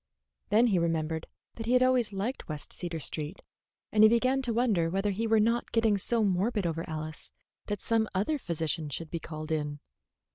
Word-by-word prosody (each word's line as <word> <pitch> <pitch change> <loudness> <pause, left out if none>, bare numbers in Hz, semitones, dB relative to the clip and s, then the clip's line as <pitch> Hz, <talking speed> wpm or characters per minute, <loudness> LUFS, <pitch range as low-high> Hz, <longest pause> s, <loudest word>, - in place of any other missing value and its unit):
Then 225 +3 +5
he 200 -7 +3
remembered 160 -1 -1 0.3
that 225 -1 -7
he 245 - +2
had 250 0 +5
always 255 -4 +3
liked 205 +5 -4
West 150 -1 -4
Cedar 170 -2 -4
Street, 155 +4 -4 0.5
and 215 - +3
he 215 - +9
began 255 +4 +2
to 250 -3 -1
wonder 220 -8 +2
whether 195 +3 0
he 225 +4 -1
were 220 0 +4
not 230 +3 +1
getting 225 -3 +3
so 230 +3 +2
morbid 200 +2 +1
over 165 -1 -1
Alice 155 0 -3 0.4
that 205 -2 -3
some 225 -1 +1
other 280 +11 +1
physician 160 - -2
should 155 +3 -4
be 170 - -2
called 155 0 -7
in. 150 -2 -2
195 Hz, 190 wpm, -29 LUFS, 165-230 Hz, 0.5 s, he